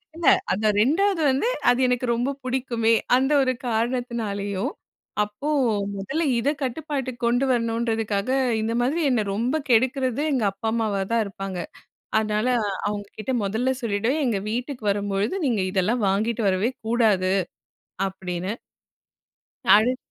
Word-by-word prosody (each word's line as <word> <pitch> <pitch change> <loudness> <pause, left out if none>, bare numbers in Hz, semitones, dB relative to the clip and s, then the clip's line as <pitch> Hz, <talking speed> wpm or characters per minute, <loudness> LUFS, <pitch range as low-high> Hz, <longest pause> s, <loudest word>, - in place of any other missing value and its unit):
இல்ல. 335 - -5 0.3
அந்த 215 +3 0
2வது 330 - +2
வந்து, 265 - +1 0.2
அது 245 +1 +3
எனக்கு 250 0 0
ரொம்ப 245 +4 0
பிடிக்குமே! 245 -3 +1 0.2
அந்த 265 +3 +2
ஒரு 255 -1 +2
காரணத்தினாலேயும், 225 -4 -2 0.5
அப்போ 210 +9 -5 0.5
முதல்ல 275 +13 -2 0.2
இத 275 - +1
கட்டுப்பாட்டுக்கு 265 -2 -3
கொண்டு 245 +3 +2
வரணுன்றதுக்காக, 225 -2 0 0.3
இந்த 225 +1 -1
மாதிரி 295 +7 +1
என்ன 235 -4 +2
ரொம்ப 240 +8 0
கெடுக்கிறது 255 +2 +2
எங்க 245 -6 +1
அப்பா, 200 +3 -3
அம்மாவாதான் 220 0 0
இருப்பாங்க. 195 -1 -6 0.6
அதனால, 215 +1 0 0.4
அவுங்கக்கிட்ட 210 +3 -5
மொதல்ல 230 +6 0
சொல்லிவிடுவேன், 230 +7 0
"எங்க 210 -4 0
வீட்டுக்கு 245 -1 -4
வரும்பொழுது 205 - -1
நீங்க 225 -6 +1
இதெல்லாம் 210 +5 +1
வாங்கிட்டு 220 +3 0
வரவே 195 +7 +1 0.2
கூடாது." 210 -6 +2 0.7
அப்பிடின்னு. 185 0 -4 1.2
அடுத் 240 +5 +3
230 Hz, 120 wpm, -24 LUFS, 205-255 Hz, 1.2 s, அது